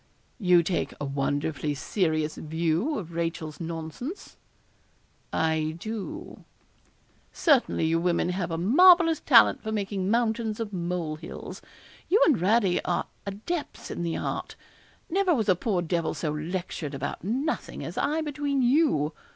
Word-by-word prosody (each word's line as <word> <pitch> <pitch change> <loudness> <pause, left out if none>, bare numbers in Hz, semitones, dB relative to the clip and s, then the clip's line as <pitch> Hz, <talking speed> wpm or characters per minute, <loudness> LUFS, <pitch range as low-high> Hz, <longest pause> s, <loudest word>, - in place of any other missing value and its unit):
'You 180 -4 +5
take 175 +1 -2
a 145 - -3
wonderfully 145 +2 -1
serious 155 -1 0
view 165 - -1
of 170 -4 -6
Rachel's 165 -2 -3
nonsense.' 165 - -6 1.0
'I 160 -1 0
do.' 225 - -6 0.9
'Certainly, 275 - +2
you 165 +1 +2
women 175 0 +1
have 180 -1 -2
a 165 - -2
marvellous 330 - +6
talent 245 -7 +5
for 220 - -4
making 200 -2 -2
mountains 225 -1 0
of 215 -3 -4
molehills 170 -3 -4 0.5
you 410 - +5
and 295 -8 +3
Radie 195 0 +3
are 175 - 0 0.2
adepts 225 - -5
in - - -4
the 170 -1 -1
art. - - -4 0.5
Never 370 -1 +2
was 220 -5 0
a 185 - +6
poor 180 -1 -1
devil 170 -1 -1
so 155 - -2
lectured 155 -1 -4
about 140 +3 -4
nothing 260 - -2
as - - -6
I 310 +2 0
between 290 -3 -1
you. 245 - +3
180 Hz, 135 wpm, -27 LUFS, 160-245 Hz, 1.0 s, marvellous